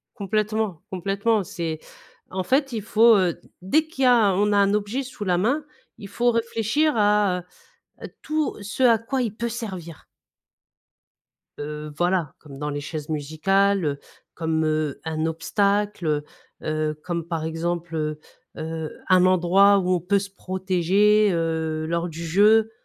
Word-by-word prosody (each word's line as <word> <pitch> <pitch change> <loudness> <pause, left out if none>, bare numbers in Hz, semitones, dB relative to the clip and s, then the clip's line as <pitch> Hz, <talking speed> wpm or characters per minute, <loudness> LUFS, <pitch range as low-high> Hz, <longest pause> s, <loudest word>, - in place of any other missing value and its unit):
Complètement. 215 -3 -1
Complètement. 200 +4 0
C'est 165 -3 -4 0.5
en 185 0 -2
fait 270 +6 +1
il 220 -3 -3
faut, 225 +1 +5
heu, 180 -3 +1 0.2
dès 310 +12 +2
qu'il 270 -4 -3
y - - +6
a 225 -5 +5
on 205 +2 +2
a - - +3
un 200 0 +3
objet 210 +6 -1
sous 250 -5 -7
la 180 -2 +1
main. 270 +10 +1 0.3
Il 200 - -9
faut 240 +4 +1
réfléchir 230 +6 0
à, 205 -3 +2 0.6
heu, - - -6
tout 310 -1 -1
ce 215 +6 -4
à 230 -2 +6
quoi 255 +4 -2
il 220 -4 -3
peut 235 +1 -3
servir. 190 -9 -7 1.5
Heu, 150 +1 -6
voilà 175 -4 0
comme 140 -3 -12
dans 150 +1 -3
les 145 0 -3
chaises 150 0 -6
musicales, 185 +6 +1
heu. 140 -1 -1 0.4
Comme, 160 -1 -1
heu, 155 -2 -1
un 160 0 -2
obstacle, 200 +3 0
heu, 150 -1 0 0.4
heu, 155 0 -1
comme 170 -2 -3
par 165 -2 -3
exemple, 165 +1 -3
heu, 155 -1 -2 0.4
heu, 160 0 -5 0.2
un 185 -1 +5
endroit 185 +3 +5
où 185 -1 -1
on 175 - -3
peut 200 +4 +1
se 200 0 -6
protéger, 190 +2 +2
heu, 160 -1 -1
lors 170 +1 -1
du 165 +1 -7
jeu. 215 +6 +4
190 Hz, 160 wpm, -24 LUFS, 160-210 Hz, 1.5 s, y